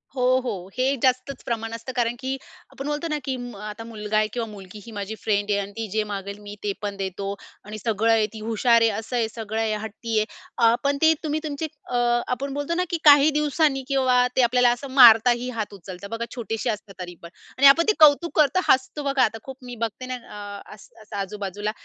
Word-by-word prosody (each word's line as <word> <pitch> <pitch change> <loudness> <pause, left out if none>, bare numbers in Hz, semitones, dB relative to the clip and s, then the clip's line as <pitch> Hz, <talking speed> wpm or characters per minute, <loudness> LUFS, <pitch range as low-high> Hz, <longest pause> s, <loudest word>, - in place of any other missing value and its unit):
हो, 250 - -1 0.2
हो, 195 -7 -5
हे 260 +2 +2
जास्तच 255 +1 +1
प्रमाण 225 -1 -3
असतं. 230 +3 -6
कारण 240 -1 0
की 265 0 -3 0.3
आपण 275 +2 -7
बोलतो 295 +3 -2
ना, 300 - 0
की 265 - -2
म 245 -3 -7
आता 210 +1 -7
मुलगा 215 -2 -3
आहे 215 - +3
किंवा 235 -2 -2
मुलगी 205 -1 -11
ही 230 - -10
माझी 205 0 -5
फ्रेंड 205 -1 0
आहे 200 - +2
आणि 200 0 -5
ती 225 -1 -3
जे 215 +1 +1
मागेल, 200 0 -5
मी 205 0 -9
ते 205 - 0
पण 205 -1 -4
देतो 195 +1 -4 0.3
आणि 210 +1 -7
सगळं 225 +1 +1
आहे, 220 -1 +4
ती 220 - -8
हुशार 230 +1 +3
आहे, 230 - +5
असं 225 +3 -6
आहे, 230 -2 +1
सगळं 220 -1 -5
आहे, 220 -1 0
हट्टी 220 +1 -4
आहे. 215 - +1 0.3
अ, 230 -2 +5
पण 280 0 +1
ते 320 0 +6
तुम्ही 305 0 -1
तुमचे 310 +1 -3 0.2
अ, 250 - -3 0.3
आपण 270 +2 -3
बोलतो 290 +4 -2
ना, 360 - +1
की 340 - -1
काही 290 0 +8
दिवसांनी 295 -2 +1
किंवा 260 -2 +2 0.2
ते 260 - +4
आपल्याला 245 0 +4
असं 245 +3 -4
मारतातही 245 -1 +6
हात 210 -2 -3
उचलता 190 0 -9
बघा, 230 +1 -3
छोटेसे 225 -1 -3
असतात 210 -2 -5
तरी 175 -1 -7
पण. 170 - -10 0.3
आणि 275 +1 +7
आपण 305 +5 +7
ते 430 - +5
कौतुक 305 +1 +5
करतो, 305 +5 +4
हसतो 265 +3 +2
बघा, 275 -2 +2
आता 225 0 0
खूप 265 -1 -9
मी 245 -1 -7
बघते 230 +3 -7
ना, 255 - -4 0.5
अ, - - -13
असं 215 +1 -13
आजूबाजूला 205 +1 -4
230 Hz, 220 wpm, -24 LUFS, 210-270 Hz, 0.5 s, काही